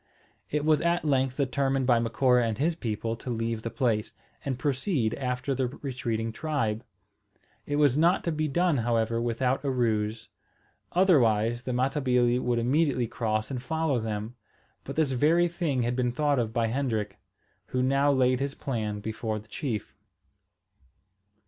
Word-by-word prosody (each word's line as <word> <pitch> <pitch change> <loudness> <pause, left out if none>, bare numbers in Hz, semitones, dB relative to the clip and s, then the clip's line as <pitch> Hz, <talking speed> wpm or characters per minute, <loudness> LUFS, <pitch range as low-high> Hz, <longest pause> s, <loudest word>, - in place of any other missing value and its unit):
It 150 0 -1
was 155 -2 +4
at 170 0 +1
length 135 -3 +1
determined 135 -1 0
by 120 -2 +4
Macora 120 +2 +3
and 110 -2 -2
his 160 +6 +1
people 115 -6 -3
to 125 - -8
leave 115 -1 -2
the 115 - -4
place, 115 -5 -1 0.3
and 130 -3 -2
proceed 135 - 0
after 125 +1 -2
the 130 -1 0
retreating 120 -4 -3
tribe. 115 -5 -2 0.8
It 145 - -1
was 145 -1 +3
not 170 +4 +3
to 170 - -1
be 155 0 -1
done, 170 +1 +2
however, 115 -1 0
without 125 +3 0
a 140 - 0
ruse; 110 -3 -1 0.6
otherwise 120 - +3
the 130 - -2
Matabili 125 -1 +2
would 125 -1 0
immediately 130 +1 +2
cross 110 -1 -2
and 125 -2 -3
follow 160 -1 0
them. 110 +1 -4 0.5
But - - -6
this 155 -4 +1
very 160 +7 +3
thing 165 -7 -1
had 120 +1 -1
been 125 -1 +1
thought 145 +1 +1
of 115 -2 -1
by 115 0 +1
Hendrik, 110 -4 -2 0.5
who 125 0 -1
now 140 +2 +3
laid 130 -2 +3
his 140 0 -2
plan 110 -6 -3
before 110 +1 -3
the 110 0 -10
chief. 115 -5 -4
125 Hz, 160 wpm, -27 LUFS, 115-140 Hz, 0.8 s, was